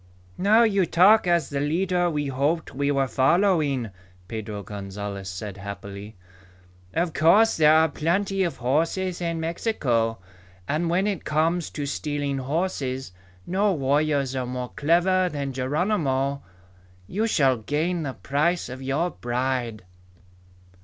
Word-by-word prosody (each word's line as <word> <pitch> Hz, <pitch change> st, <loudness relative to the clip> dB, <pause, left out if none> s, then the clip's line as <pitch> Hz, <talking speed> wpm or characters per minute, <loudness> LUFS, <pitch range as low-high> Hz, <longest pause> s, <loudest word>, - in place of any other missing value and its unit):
"Now 215 Hz, +5 st, +5 dB
you 200 Hz, -5 st, +2 dB
talk 190 Hz, +4 st, +5 dB
as 170 Hz, -5 st, +1 dB
the 140 Hz, -, -1 dB
leader 175 Hz, +4 st, +1 dB
we 150 Hz, -3 st, -2 dB
hoped 140 Hz, +5 st, -1 dB
we 140 Hz, +1 st, -1 dB
were 135 Hz, -1 st, +1 dB
following," 145 Hz, -, +2 dB, 0.4 s
Pedro 105 Hz, -2 st, -5 dB
Gonzalez 100 Hz, 0 st, -6 dB
said 95 Hz, +2 st, -6 dB
happily. 100 Hz, +1 st, -8 dB, 0.8 s
"Of 170 Hz, -1 st, 0 dB
course 200 Hz, +10 st, +5 dB
there 155 Hz, 0 st, +6 dB
are 160 Hz, 0 st, +5 dB
plenty 190 Hz, +6 st, -1 dB
of 175 Hz, -3 st, -1 dB
horses 165 Hz, +8 st, 0 dB
in 170 Hz, -1 st, -2 dB
Mexico. 135 Hz, -, 0 dB, 0.5 s
And 160 Hz, +4 st, 0 dB
when 180 Hz, +3 st, +1 dB
it 200 Hz, -5 st, -2 dB
comes 160 Hz, +3 st, 0 dB
to 145 Hz, -, -5 dB
stealing 145 Hz, -1 st, -2 dB
horses, 135 Hz, -, -2 dB, 0.3 s
no 195 Hz, +2 st, +1 dB
warriors 140 Hz, -2 st, +1 dB
are 130 Hz, -1 st, -2 dB
more 125 Hz, 0 st, -4 dB
clever 180 Hz, +4 st, +2 dB
than 140 Hz, -4 st, -4 dB
Geronimo. 140 Hz, -1 st, 0 dB, 0.6 s
You 215 Hz, -, -1 dB
shall 135 Hz, -, +3 dB
gain 160 Hz, +9 st, -1 dB
the 140 Hz, -4 st, -3 dB
price 155 Hz, +5 st, 0 dB
of 130 Hz, +1 st, -7 dB
your 140 Hz, +7 st, -1 dB
bride." 120 Hz, -3 st, -2 dB
145 Hz, 130 wpm, -25 LUFS, 130-175 Hz, 0.8 s, there